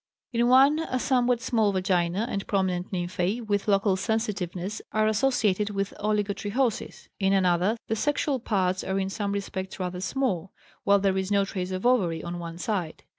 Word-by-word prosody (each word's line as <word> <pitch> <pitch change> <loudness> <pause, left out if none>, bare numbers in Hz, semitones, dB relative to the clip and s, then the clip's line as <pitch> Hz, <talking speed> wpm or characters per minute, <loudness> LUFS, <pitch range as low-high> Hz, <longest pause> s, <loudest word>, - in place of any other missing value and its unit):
In 235 0 +2
one 270 +5 +6
a 320 -5 -2
somewhat 250 -2 +2
small 225 -5 +2
vagina 185 +1 +1
and 200 -4 -4
prominent 185 -3 0
nymphæ, 185 +5 -2
with 205 -1 -1
local 195 -1 +3
sensitiveness, 200 -2 -2
are 215 0 +2
associated 215 -3 +2
with 195 -1 -2
oligotrichosis. 210 +3 -1
In 195 -1 +2
another 185 +3 +2
the 220 - -1
sexual 285 +2 0
parts 185 -5 0
are 190 0 -1
in 190 0 -1
some 205 -1 -2
respects 195 -1 -4
rather 180 -1 -3
small, 195 -5 -1 0.3
while 200 0 +6
there 195 -1 +1
is 190 0 -3
no 200 -1 +3
trace 185 -2 -4
of 185 +3 -4
ovary 185 -10 +2
on 175 0 -5
one 170 -1 -7
side. 180 -4 -3
200 Hz, 170 wpm, -26 LUFS, 185-220 Hz, 0.3 s, one